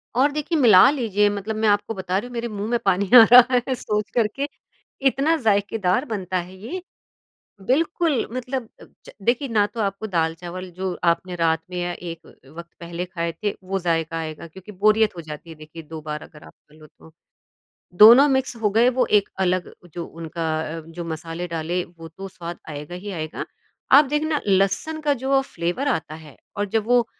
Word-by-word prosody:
और 280 +3 +3
देखिए, 300 +3 -2
मिला 225 -2 +7
लीजिए, 210 -7 +1
मतलब 205 +2 -4
मैं 220 0 0
आपको 205 +2 +1
बता 185 -1 -2
रही 210 - -3
हूँ 245 - -12
मेरे 235 0 -3
मुँह 210 -1 -5
में 240 0 +1
पानी 195 0 +1
आ 230 - +11
रहा 250 0 +8
है 260 - 0
सोच 210 -4 -2
कर 230 -3 +3
के, 280 +1 -2 0.6
इतना 280 +5 +2
ज़ायकेदार 205 -1 +1
बनता 190 - -3
है 180 +1 -6
ये 315 - -6 0.8
बिल्कुल, 300 - +1
मतलब 255 -1 -4
अ, - - -11 0.2
ज - - -12
देखिए, 245 +6 +1
ना 215 -4 +2
तो 220 +2 -5
आपको 200 +2 -2
दाल 165 -4 0
चावल 180 +2 -8
जो 185 -1 -2 0.2
आपने 180 +1 -9
रात 165 -1 +1
में 180 - -6
या 175 - -2
एक 170 -2 -8
अ, - - -15 0.3
वक़्त 170 0 -9
पहले 170 +1 -5
खाए 170 -2 -3
थे, 205 - 0
वो 195 +1 -2
ज़ायका 165 -1 -1
आएगा, 160 0 -6
क्योंकि 190 +5 -13
बोरियत 215 +1 +2
हो 170 - -6
जाती 155 +1 -10
है 160 - -9
देखिए 155 +2 -11
2 155 +1 -9
बार 150 0 -5
अगर 150 -2 -15
आप - - -15 0.2
खा 150 - -20
लो 155 -1 -15
तो। 160 - -19 0.9
दोनों 235 +7 +9
मिक्स 265 -3 0
हो 210 - +3
गए, 230 +4 +4
वो 255 0 +1
एक 205 -1 +3
अलग 185 -1 0 0.2
जो 170 -1 -4
उनका 165 0 -5 0.3
अ, - - -6
जो 170 +1 -7
मसाले 165 +2 -5
डाले, 170 +2 -2
वो 165 -2 -13
तो 195 +5 -9
स्वाद 175 -2 -8
आएगा 150 +3 -7
ही 200 +3 -7
आएगा। 155 -4 -5 0.5
आप 290 +2 +9
देखना 295 +2 -1
लहसुन 195 +11 +1
का 295 -2 +1
जो 265 +1 -4
अ, 270 - +5
फ़्लेवर 245 +2 -3
आता 160 - -2
है 155 -3 -13 0.2
और 205 0 -1
जब 220 -1 0
वो 245 -1 +3
195 Hz, 205 wpm, -22 LUFS, 170-240 Hz, 0.9 s, आ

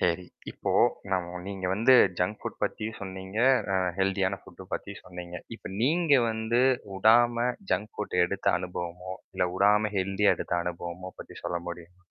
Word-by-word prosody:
சரி, 90 +1 +1 0.3
இப்போ - - -3 0.4
நம் 90 -2 +1 0.2
நீங்க 95 -2 -5
வந்து 115 +7 +5 0.2
ஜங்க் 90 +4 0
ஃபுட் - - -6
பத்தியும் 110 +1 -2
சொன்னீங்க. 95 +2 -6 0.4
அ - - +3 0.2
ஹெல்த்தியான 95 0 +1
ஃபுட்டு 95 +2 -13
பத்தியும் 100 0 -7
சொன்னீங்க. 90 -1 -8 0.2
இப்ப - - -9
நீங்க 160 +3 +3 0.2
வந்து 110 +2 0 0.4
உடாம 120 +3 +5 0.2
ஜங்க் 105 +1 -1
ஃபுட்ட 105 - -3
எடுத்த 100 +2 -5
அனுபவமோ, 90 0 -5 0.2
இல்லை 90 - +1
உடாம 105 +2 +4
ஹெல்த்தியா 95 +2 +3
எடுத்த - - -3
அனுபவமோ 90 +1 -5
பத்தி - - -11
சொல்ல 85 - -1
முடியுங் 85 0 -9
95 Hz, 150 wpm, -28 LUFS, 90-110 Hz, 0.4 s, வந்து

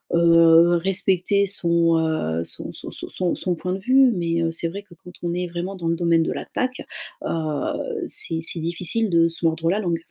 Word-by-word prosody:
heu, 165 0 +6
respecter 190 +2 +1
son, 170 -4 +2
heu, 155 - -1
son - - -4
son - - -9
son - - -8
son 180 -2 -1
son 180 -2 -2
point 180 +2 -4
de 190 - -3
vue 255 +5 +4
mais, 170 -3 -1
heu, 165 0 0
c'est 165 +1 -2
vrai 200 +4 -7
que 190 -4 -18
quand 180 - -11
on 170 0 -1
est 180 0 -2
vraiment 175 +3 -5
dans 170 -3 -5
le 165 - +1
domaine 170 -1 +2
de - - -2
l'attaque, 255 +1 -4 0.4
heu, 165 - -3
c'est 165 - -1
c'est 165 +1 -5
difficile 175 +7 -1
de 165 0 +4
se 165 +1 -6
mordre 165 0 +1
la 195 +4 +1
langue. 170 -5 -2
170 Hz, 210 wpm, -22 LUFS, 165-190 Hz, 0.4 s, heu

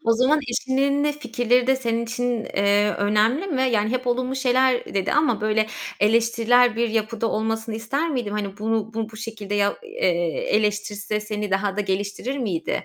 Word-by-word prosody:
O 230 - +4
zaman 260 +6 +3
eşinin 270 +3 +1
de 295 - +1
fikirleri 245 -4 +1
de 265 0 +3
senin 235 -2 -1
için, 245 -1 -2
eee, 200 +1 +2
önemli 215 - +2
mi? 275 -8 0
Yani, 215 0 +1
hep 255 +1 -2
olumlu 255 +2 0
şeyler 255 -2 +1
dedi 195 -1 0
ama, 295 -8 +2
böyle, 215 0 +1 0.3
eleştirel 230 +2 +3
bir 235 0 +1
yapıda 225 +1 -1
olmasını 225 0 -2
ister 275 +9 -2
miydim? 240 -7 -2
Hani, 200 -2 -4
bunu, 220 0 -1
bu 225 0 -3
bu 220 - -12
şekilde 215 -2 -6
ya 205 0 +1
eee, 175 -2 -1
eleştirse 210 0 0
seni 210 -1 -4
daha 195 0 0
da - - 0
geliştirir 205 +7 -2
miydi? 190 -10 -2
225 Hz, 175 wpm, -23 LUFS, 210-250 Hz, 0.3 s, O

